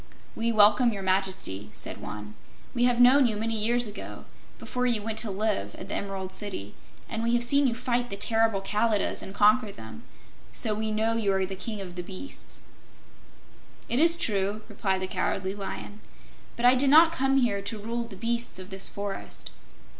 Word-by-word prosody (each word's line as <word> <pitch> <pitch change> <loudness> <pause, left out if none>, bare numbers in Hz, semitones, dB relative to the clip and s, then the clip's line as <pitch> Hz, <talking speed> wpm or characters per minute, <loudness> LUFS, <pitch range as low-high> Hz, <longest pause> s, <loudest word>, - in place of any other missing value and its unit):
"We 230 +1 0
welcome 215 +3 +5
Your 200 -3 -5
Majesty," 185 - -1
said - - -7
one. 105 0 -7 0.4
"We 240 -1 +2
have 245 -1 +2
known 255 +2 +7
you 220 - -1
many 225 +2 -2
years 235 +3 +2
ago, 210 -1 -8 0.3
before 250 0 -2
you 230 -4 0
went 220 0 -2
to 220 -1 0
live 195 - -1
at 190 - -9
the - - -3
Emerald 190 -1 -4
City, 190 - -6 0.3
and 225 -1 -4
we 235 +1 +1
have 240 - +2
seen 280 +3 +4
you 235 - -1
fight 245 0 -1
the 200 - -4
terrible 225 -1 +2
Kalidahs 210 +1 0
and 195 - -8
conquer 210 +1 +4
them, 110 - -11 0.5
so 215 - -1
we 220 +1 -2
know 220 +1 +1
you 215 -3 +1
are 190 0 +1
the 190 +1 -6
King 205 +2 -4
of 180 -2 -8
all 180 - -5
Beasts." 190 +9 -9 1.3
"It 240 - +1
is 335 +2 +6
true," 205 - -1
replied 195 -3 -1
the - - -1
Cowardly 190 0 -2
Lion; 205 +1 -7 0.6
"but 235 - -1
I 250 - +8
did 265 +2 +3
not 320 +3 +7
come 270 -3 +1
here 225 -6 +1
to 215 +3 -3
rule 230 +3 -4
the 225 -4 -11
beasts 235 +2 -2
of 185 +1 -10
this 190 0 0
forest. 200 -1 -6
215 Hz, 190 wpm, -27 LUFS, 195-235 Hz, 1.3 s, I